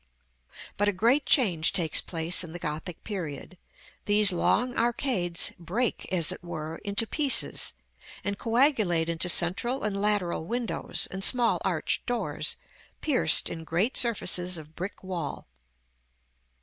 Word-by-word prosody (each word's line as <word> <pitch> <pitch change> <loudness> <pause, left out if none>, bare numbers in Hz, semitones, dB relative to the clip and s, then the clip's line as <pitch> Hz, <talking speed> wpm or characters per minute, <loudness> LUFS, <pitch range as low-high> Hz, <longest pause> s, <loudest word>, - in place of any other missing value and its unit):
But 205 - +1
a 205 - +1
great 235 +9 +1
change 180 - +2
takes 165 -4 +2
place 165 +1 +1
in 165 -2 -9
the - - -5
Gothic 160 +1 -6
period. 180 -4 -6 0.5
These 205 -1 +4
long 245 +7 0
arcades 230 - 0
break, 210 +8 -3
as 170 -4 +2
it - - -8
were, 160 -2 -6
into 205 +2 -1
pieces, 280 +3 +2 0.5
and 200 0 -2
coagulate 225 - +1
into 170 +2 +1
central 195 +11 +2
and 200 -2 -2
lateral 200 -6 +1
windows, 235 +4 -3
and 190 +1 -5
small 240 0 +4
arched - - -1
doors, 245 -2 -2 0.4
pierced 250 - +4
in 165 - -6
great 175 +10 -1
surfaces 185 -6 +2
of 155 0 -12
brick 185 +4 -7
wall. 175 -6 -5
190 Hz, 135 wpm, -27 LUFS, 170-230 Hz, 0.5 s, These